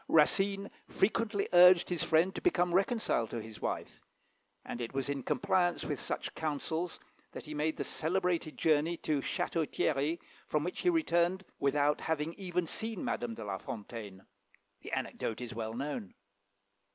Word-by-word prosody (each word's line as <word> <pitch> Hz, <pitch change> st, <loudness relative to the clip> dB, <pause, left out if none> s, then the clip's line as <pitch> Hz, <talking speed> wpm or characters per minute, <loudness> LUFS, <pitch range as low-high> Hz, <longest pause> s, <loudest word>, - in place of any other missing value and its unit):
Racine 195 Hz, +6 st, +3 dB, 0.2 s
frequently 210 Hz, 0 st, +1 dB
urged 180 Hz, 0 st, +8 dB
his 175 Hz, -3 st, 0 dB
friend 170 Hz, +4 st, +3 dB
to -, -, -5 dB
become 180 Hz, -, +2 dB
reconciled 195 Hz, -, +1 dB
to 120 Hz, -, -3 dB
his 110 Hz, -1 st, -10 dB
wife, -, -, -4 dB, 0.6 s
and 120 Hz, -, -5 dB
it 120 Hz, +3 st, -5 dB
was 135 Hz, 0 st, -1 dB
in 140 Hz, -1 st, -1 dB
compliance 175 Hz, +6 st, +1 dB
with 145 Hz, -3 st, -2 dB
such -, -, -3 dB
counsels 160 Hz, +3 st, -2 dB, 0.3 s
that -, -, -7 dB
he 155 Hz, -, -6 dB
made 150 Hz, +1 st, 0 dB
that -, -, -1 dB
celebrated 170 Hz, -1 st, 0 dB
journey 160 Hz, +2 st, +2 dB
to 150 Hz, -4 st, 0 dB
Château 160 Hz, +3 st, -1 dB
Thierry, 150 Hz, +3 st, +1 dB, 0.3 s
from 150 Hz, -1 st, +1 dB
which 180 Hz, -, -4 dB
he 360 Hz, -, +3 dB
returned 190 Hz, -, +2 dB
without 145 Hz, +1 st, +2 dB
having 160 Hz, 0 st, -1 dB
even 180 Hz, -2 st, -2 dB
seen 220 Hz, +4 st, -3 dB
Madame 120 Hz, -2 st, -2 dB
de -, -, -7 dB
La 95 Hz, -2 st, -3 dB
Fontaine. 105 Hz, -3 st, -7 dB, 0.6 s
The -, -, -8 dB
anecdote 110 Hz, -, -2 dB
is 125 Hz, 0 st, -6 dB
well 110 Hz, -1 st, -4 dB
known. 135 Hz, -7 st, -4 dB
160 Hz, 160 wpm, -32 LUFS, 135-180 Hz, 0.6 s, urged